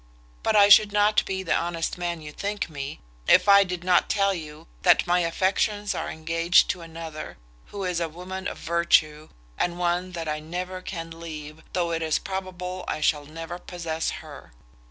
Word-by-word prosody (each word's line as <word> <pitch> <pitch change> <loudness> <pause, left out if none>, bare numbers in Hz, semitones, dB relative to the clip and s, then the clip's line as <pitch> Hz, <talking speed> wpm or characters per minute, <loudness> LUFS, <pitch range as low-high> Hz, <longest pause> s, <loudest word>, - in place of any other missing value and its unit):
But - - +1
I 205 -1 +8
should 205 0 +7
not 210 +1 +3
be 190 0 -2
the 175 - 0
honest 170 -1 -1
man 175 -2 -3
you 150 -1 -8
think 200 +1 -4
me, 140 0 -6 0.3
if 185 - +6
I 200 0 +8
did 180 -2 -5
not 180 -1 +3
tell 200 -1 +2
you 155 -4 -8 0.2
that - - +5
my 175 +1 +3
affections 195 +4 0
are - - -3
engaged 165 +2 +3
to 180 - -7
another, 165 -1 -8 0.3
who 200 -1 -6
is 180 -2 -1
a 165 -1 -1
woman 180 +3 -6
of - - -5
virtue, 160 -2 +2 0.3
and 175 0 0
one 180 +1 -1
that 165 -2 -4
I 150 0 -2
never 180 +4 -5
can 165 -3 -6
leave, 155 -1 -8
though 175 -2 0
it 165 0 -1
is 160 -1 +1
probable 185 -1 -5
I - - -2
shall 150 -1 +1
never 165 +3 -7
possess 165 -3 -3 0.2
her. - - -12
175 Hz, 185 wpm, -25 LUFS, 160-185 Hz, 0.3 s, I